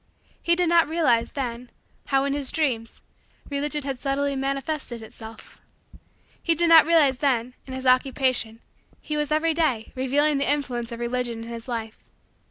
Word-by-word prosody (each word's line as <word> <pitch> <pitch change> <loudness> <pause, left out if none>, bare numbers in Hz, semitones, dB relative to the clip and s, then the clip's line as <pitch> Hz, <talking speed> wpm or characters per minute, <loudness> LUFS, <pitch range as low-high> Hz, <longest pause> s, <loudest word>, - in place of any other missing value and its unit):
He 340 - +2
did 355 0 +1
not 335 -1 +4
realize, 270 -8 +1
then, 245 -3 -4 0.4
how, 270 -1 +2
in 280 0 0
his 280 -2 -2
Dreams, 250 -8 -2 0.5
Religion 290 +1 -1
had 270 -2 -4
subtly 280 +1 -1
manifested 270 -2 -2
itself. 220 0 -12 0.8
He 335 - +2
did 340 +1 +1
not 325 -1 +8
realize, 295 -6 +4
that, 255 -5 +2 0.2
in 260 - -7
his 260 0 -6
Occupation, 255 -3 +2 0.4
he 300 - -5
was, 300 -1 -1
every 315 +1 +2
day, 270 -9 0
revealing 280 +3 +1
the 280 - +2
influence 245 -5 -2
of 235 - -6
Religion 240 -1 -3
in 230 - -9
his 230 0 -7
life. 225 -3 -5
270 Hz, 165 wpm, -24 LUFS, 240-300 Hz, 0.8 s, not